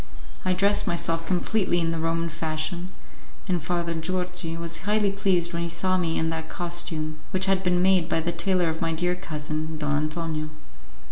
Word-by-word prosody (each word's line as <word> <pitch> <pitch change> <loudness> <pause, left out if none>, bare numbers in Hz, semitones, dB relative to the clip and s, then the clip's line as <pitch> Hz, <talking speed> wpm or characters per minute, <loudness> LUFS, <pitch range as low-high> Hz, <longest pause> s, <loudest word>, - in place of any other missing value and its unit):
I 185 - +2
dressed 200 +3 +2
myself 165 -1 0
completely 185 0 +2
in 165 -1 +1
the 165 - -2
Roman 165 +1 0
fashion, 165 +2 -2 0.6
and 180 -3 +1
Father 170 +1 -1
Georgi 180 0 -2
was 170 0 -2
highly 205 0 +2
pleased 185 -4 +1
when 170 - -1
he 170 - -1
saw 185 +2 +2
me 170 -3 +1
in 160 0 +1
that 160 0 -4
costume, 165 -3 -1
which 190 0 +2
had 195 -1 +3
been 180 -1 +2
made 185 -3 +4
by 165 - +2
the 170 +2 0
tailor 180 +1 +2
of 160 0 -2
my 165 -1 +1
dear 175 +2 +1
cousin, 155 -3 -4
Don 150 -1 0
Antonio. 155 +1 -1
170 Hz, 185 wpm, -26 LUFS, 160-185 Hz, 0.6 s, made